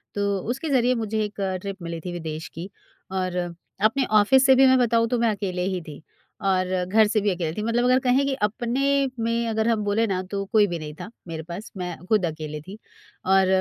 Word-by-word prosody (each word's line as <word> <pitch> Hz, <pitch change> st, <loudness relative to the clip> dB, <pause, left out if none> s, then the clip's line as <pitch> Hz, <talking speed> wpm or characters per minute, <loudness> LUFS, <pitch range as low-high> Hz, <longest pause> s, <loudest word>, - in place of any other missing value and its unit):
तो 200 Hz, -1 st, 0 dB
उसके 270 Hz, +6 st, -2 dB
ज़रिए 255 Hz, -2 st, +3 dB
मुझे 220 Hz, -1 st, -1 dB
एक 210 Hz, 0 st, -6 dB, 0.2 s
ट्रिप 195 Hz, -1 st, -6 dB
मिली 170 Hz, -1 st, -5 dB
थी 180 Hz, -, -3 dB
विदेश 160 Hz, -2 st, -5 dB
की 175 Hz, +4 st, -7 dB, 0.4 s
और 185 Hz, -1 st, -2 dB, 0.5 s
अपने 255 Hz, +5 st, +3 dB
ऑफिस 265 Hz, +6 st, +5 dB
से 265 Hz, -, +7 dB
भी 265 Hz, +1 st, +6 dB
मैं 260 Hz, 0 st, +5 dB
बताऊँ 230 Hz, -1 st, +3 dB
तो 245 Hz, -, +1 dB
मैं 230 Hz, -1 st, +3 dB
अकेले 190 Hz, -3 st, -3 dB
ही 185 Hz, -2 st, -2 dB
थी। 150 Hz, 0 st, -9 dB, 0.4 s
और 185 Hz, -1 st, +2 dB, 0.2 s
घर 215 Hz, +4 st, +4 dB
से 215 Hz, +1 st, +1 dB
भी 205 Hz, -, +1 dB
अकेले 170 Hz, -3 st, -2 dB
थी -, -, -1 dB
मतलब 230 Hz, +2 st, +1 dB
अगर 255 Hz, +1 st, +4 dB
कहें 260 Hz, +2 st, +2 dB
कि 275 Hz, -, 0 dB
अपने 235 Hz, +5 st, -1 dB, 0.4 s
में 230 Hz, 0 st, 0 dB
अगर 220 Hz, 0 st, 0 dB
हम 225 Hz, -2 st, +1 dB
बोले 205 Hz, +2 st, +1 dB
ना 185 Hz, -2 st, -1 dB
तो 200 Hz, -1 st, -2 dB
कोई 215 Hz, -3 st, +5 dB
भी 175 Hz, -3 st, -4 dB
नहीं 150 Hz, -1 st, -7 dB
था -, -, -7 dB, 0.2 s
मेरे 160 Hz, -1 st, -5 dB
पास 175 Hz, +6 st, -8 dB
मैं 180 Hz, -1 st, -4 dB
खुद 210 Hz, -1 st, +2 dB
अकेले 155 Hz, -2 st, -5 dB
थी। 190 Hz, +7 st, -10 dB, 0.5 s
और 190 Hz, 0 st, +4 dB
205 Hz, 220 wpm, -24 LUFS, 180-230 Hz, 0.5 s, से